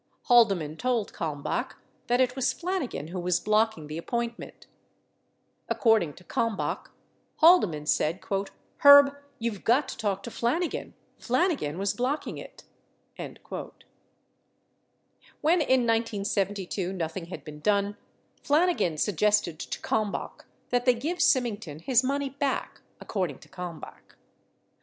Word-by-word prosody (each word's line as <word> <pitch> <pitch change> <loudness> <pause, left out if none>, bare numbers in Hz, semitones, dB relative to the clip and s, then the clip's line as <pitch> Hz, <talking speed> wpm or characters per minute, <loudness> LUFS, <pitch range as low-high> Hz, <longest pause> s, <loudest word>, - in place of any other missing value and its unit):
Haldeman 195 - +4
told 245 -2 -1
Kalmbach 150 -4 -3 0.3
that 245 +1 +2
it 255 -1 +2
was 265 -2 0
Flanigan 335 - -3
who 180 +1 -4
was 180 0 +1
blocking 215 -6 +1
the 155 +2 -5
appointment. 235 +5 -4 1.0
According 220 - +3
to 180 - -15
Kalmbach, 230 0 -2 0.5
Haldeman 210 - +5
said, 155 +3 +1 0.6
"Herb, 285 0 +8 0.2
you've 225 -4 -4
got 260 +4 +3
to - - -6
talk 200 -3 -2
to 235 - -7
Flanigan. 310 +11 -1 0.3
Flanigan 255 - 0
was 195 +1 0
blocking 260 +5 -2
it." - - -12 0.5
6 - - -8 2.0
When 330 +3 +3
in 260 -4 +3
1972 200 -4 -1
nothing 170 -1 -4
had 175 - -9
been 150 -1 -9
done, 200 +3 +1 0.5
Flanigan 300 - +2
suggested 205 -1 +1
to - - -5
Kalm 215 -2 0
bach - - -7 0.2
that 245 0 +1
they 250 -1 +5
give 315 +9 -3
Symington 220 - +1
his 240 +9 +2
money 275 +1 -1
back, 280 0 -2 0.2
according 180 -9 -3
to - - -17
Kalm 180 -3 -7
bach. - - -13
220 Hz, 125 wpm, -27 LUFS, 180-255 Hz, 2.0 s, Herb